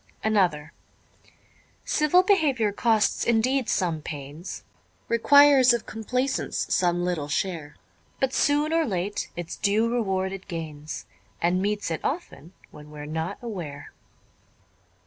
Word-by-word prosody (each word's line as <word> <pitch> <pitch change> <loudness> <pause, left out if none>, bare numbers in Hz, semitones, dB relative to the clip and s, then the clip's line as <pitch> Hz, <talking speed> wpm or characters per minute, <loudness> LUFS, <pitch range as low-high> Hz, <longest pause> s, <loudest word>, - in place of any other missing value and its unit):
_ - - -38 0.2
Another 175 -8 +1 1.1
_Civil 340 +5 +3
behaviour 280 - +2
costs 220 0 +1
indeed 235 +2 +1
some 165 -4 0
pains, 145 +4 -7 0.4
Requires 270 +1 +6
of 235 - -5
complaisance 250 +4 -2
some 175 -1 +2
little 170 -5 -2
share; 155 -1 -3 0.4
But 265 0 0
soon 295 +2 +2
or 330 0 +3
late 200 - -3
its 175 -1 -6
due 215 +3 +2
reward 190 -5 0
it 195 -1 -9
gains, 155 -3 -6 0.3
And 175 +2 +1
meets 205 -2 -1
it 160 - -3
often 225 - -4 0.2
when 150 0 -13
we're 150 -1 -8
not 160 +5 -3
aware. 175 -11 -7
195 Hz, 125 wpm, -25 LUFS, 165-245 Hz, 1.1 s, Requires